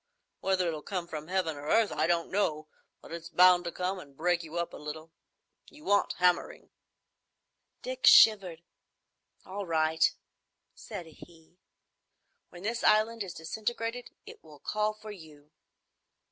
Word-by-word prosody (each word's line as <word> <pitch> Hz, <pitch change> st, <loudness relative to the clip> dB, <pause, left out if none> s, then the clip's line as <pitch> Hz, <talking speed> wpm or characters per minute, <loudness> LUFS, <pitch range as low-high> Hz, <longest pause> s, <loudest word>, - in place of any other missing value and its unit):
Whether 190 Hz, -2 st, +1 dB
it'll 155 Hz, -2 st, -3 dB
come 180 Hz, 0 st, -4 dB
from 155 Hz, -2 st, -7 dB
heaven 180 Hz, -4 st, -1 dB
or 145 Hz, +1 st, -9 dB
earth, 225 Hz, +5 st, +3 dB
I 155 Hz, +2 st, 0 dB
don't 170 Hz, -1 st, 0 dB
know, 155 Hz, -6 st, -1 dB, 0.3 s
but -, -, -14 dB
it's 170 Hz, 0 st, -7 dB
bound 180 Hz, -1 st, +5 dB
to 170 Hz, -, -3 dB
come 185 Hz, +2 st, -3 dB
and 140 Hz, -5 st, -14 dB
break 175 Hz, +1 st, +1 dB
you 165 Hz, 0 st, -8 dB
up 170 Hz, 0 st, -2 dB
a -, -, -8 dB
little. 155 Hz, +2 st, -8 dB, 0.6 s
You 300 Hz, 0 st, -17 dB
want 205 Hz, -6 st, +2 dB
hammering." 180 Hz, -1 st, 0 dB, 1.1 s
Dick -, -, -1 dB
shivered. 185 Hz, -6 st, +6 dB, 0.8 s
"All 195 Hz, 0 st, -6 dB
right," 160 Hz, 0 st, +1 dB, 0.7 s
said 175 Hz, -, -8 dB
he. 165 Hz, +2 st, -17 dB, 0.9 s
"When 175 Hz, +1 st, -12 dB
this 230 Hz, +3 st, -2 dB
island 220 Hz, +2 st, +3 dB
is 185 Hz, -3 st, -5 dB
disintegrated, 230 Hz, +8 st, -4 dB, 0.2 s
it -, -, -13 dB
will 155 Hz, -2 st, -15 dB
call 210 Hz, +7 st, -1 dB
for 215 Hz, 0 st, -10 dB
you." 155 Hz, -6 st, -14 dB
175 Hz, 145 wpm, -29 LUFS, 160-205 Hz, 1.1 s, shivered